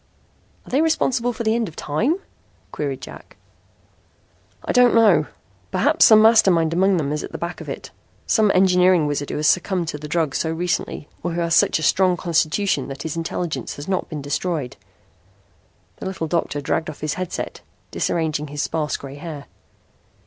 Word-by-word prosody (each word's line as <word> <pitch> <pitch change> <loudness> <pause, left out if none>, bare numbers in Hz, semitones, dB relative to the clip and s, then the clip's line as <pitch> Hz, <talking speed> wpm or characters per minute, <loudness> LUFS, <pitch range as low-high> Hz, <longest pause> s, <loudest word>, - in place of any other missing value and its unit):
"Are - - -13
they 270 +4 +3
responsible 260 -6 +1
for 235 0 -5
the 220 0 +2
end 230 -1 0
of 165 - -11
time?" 215 - 0 0.6
queried 140 -3 -4
Jack. - - -12 1.3
"I - - -1
don't 250 -2 +5
know. 225 -2 +5 0.4
Perhaps - - +3
some 220 -2 +7
master 225 -2 +6
mind 165 -2 +2
among 190 +2 +3
them 145 -3 -1
is 150 0 -2 0.2
back 170 +1 -5
of - - -8
it - - -7 0.3
some 215 -2 +3
engineering 180 -2 +4
wizard 145 -1 -2
who - - -4
has 150 - -2
succumbed 180 0 +1
to 150 - -5
the 150 - -7
drug 155 -2 0
so 160 - -1
recently, 170 -3 -2
or 175 0 -3
who 170 - -1
has 170 -1 0
such 170 - +4
a 160 - -5
strong 185 +3 +3
constitution 170 -2 0
that 135 0 -7
his 160 -1 -4
intelligence 165 0 -3
has 145 - -8
not 190 -1 -2
been 150 -3 -6
destroyed." 145 -1 -2 1.2
The - - -6
little 190 -4 -3
doctor 160 -3 -1
dragged 160 +3 -1
off - - -10
his 155 -1 -1
headset, 185 -1 -5 0.3
disarranging 155 -3 -1
his 145 +1 -3
sparse 155 -2 -2
gray 140 0 -9
hair. 150 -2 -8
170 Hz, 180 wpm, -21 LUFS, 150-190 Hz, 1.3 s, some